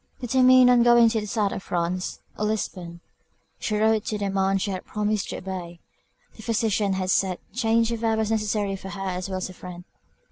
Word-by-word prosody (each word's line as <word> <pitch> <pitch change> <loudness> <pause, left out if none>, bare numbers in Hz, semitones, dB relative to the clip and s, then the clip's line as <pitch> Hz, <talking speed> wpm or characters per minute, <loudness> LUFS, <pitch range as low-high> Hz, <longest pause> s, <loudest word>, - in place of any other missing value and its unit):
Determined 255 0 +5
on 245 -1 +5
going 240 -1 +6
to 220 -1 -1
the 210 - -6
South 205 -1 0
of - - -5
France, 180 0 -3
or 210 - -2
Lisbon; 180 -5 -4 0.6
she 215 - -1
wrote 220 0 +2
to 215 - -2
the 200 -1 -2
man 195 0 +1
she 195 +1 -2
had 185 - -5
promised 210 -1 -2
to - - -4
obey. 180 -2 -7 0.6
The - - -12
physicians 215 -3 0
had 185 0 -1
said 185 -2 +1 0.2
change 230 -1 +1
of 230 0 -4
air 225 -1 +2
was 220 0 0
necessary 210 -2 0
for 190 0 -8
her 195 +1 -5
as 185 +1 -4
well 190 - -3
as 185 - -3
her 185 - -10
friend. 180 -1 -10
205 Hz, 210 wpm, -24 LUFS, 185-225 Hz, 0.6 s, going